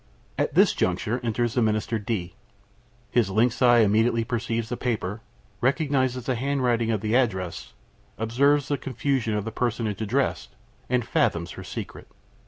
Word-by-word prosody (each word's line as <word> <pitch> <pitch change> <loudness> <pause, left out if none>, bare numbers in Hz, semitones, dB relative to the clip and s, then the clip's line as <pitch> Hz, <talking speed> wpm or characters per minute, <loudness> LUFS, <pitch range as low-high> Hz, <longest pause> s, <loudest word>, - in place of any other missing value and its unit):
At - - -1
this - - +5
juncture 120 +4 0
enters 120 0 -1
the 125 - +1
Minister 110 +1 0
D. 100 -5 -3 0.8
His 115 -5 +2
lynx 115 +6 +1
eye 120 -2 +6
immediately 115 +2 +3
perceives 115 -1 -2
the 120 - -2
paper, 110 -4 -3 0.4
recognizes 130 -2 +1
the 130 - +1
handwriting 125 -3 0
of 110 -3 0
the 110 +1 -1
address, 95 -9 -1 0.4
observes 140 +6 +2
the 145 - -1
confusion 130 -3 -1
of 105 -1 -2
the 115 - -4
personage 110 -3 -2
addressed, 110 - -1 0.3
and 125 -2 +1
fathoms - - 0
her - - -8
secret. - - -7
115 Hz, 150 wpm, -25 LUFS, 110-125 Hz, 0.8 s, eye